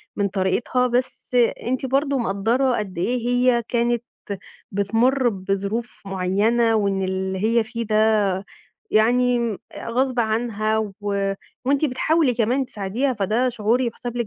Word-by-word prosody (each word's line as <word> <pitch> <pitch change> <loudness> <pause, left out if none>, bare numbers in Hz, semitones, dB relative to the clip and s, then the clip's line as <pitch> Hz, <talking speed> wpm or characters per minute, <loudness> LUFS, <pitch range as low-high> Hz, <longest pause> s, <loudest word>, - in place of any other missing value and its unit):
من 200 -1 +1
طريقتها، 200 +6 0
بس 250 +1 -2 0.3
أنتِ 260 +2 -1
برضه 275 +2 +1
مقدّرة 235 +4 +1
قد 195 -4 -5
إيه 240 +9 0
هي 245 -1 +3
كانت 240 -1 0 0.7
بتمُر 235 +6 +2
بظروف 200 +3 -3
معيّنة 205 +5 +1
وإن 200 -2 +1
اللي 190 0 -2
هي 230 +1 +3
فيه 230 +1 -5
ده 215 0 -1 1.0
يعني 235 0 +2 0.3
غصب 250 +1 0
عنها 220 -1 0
و 215 -2 -2 0.7
وأنتِ 275 +3 +2
بتحاولي 300 0 +2
كمان 245 +4 +1
تساعديها، 230 +5 -2
فده 220 +3 +1
شعور 230 0 +1
يُحسَب 240 0 -3
لِك 235 -1 -1
235 Hz, 125 wpm, -22 LUFS, 205-250 Hz, 1.0 s, هي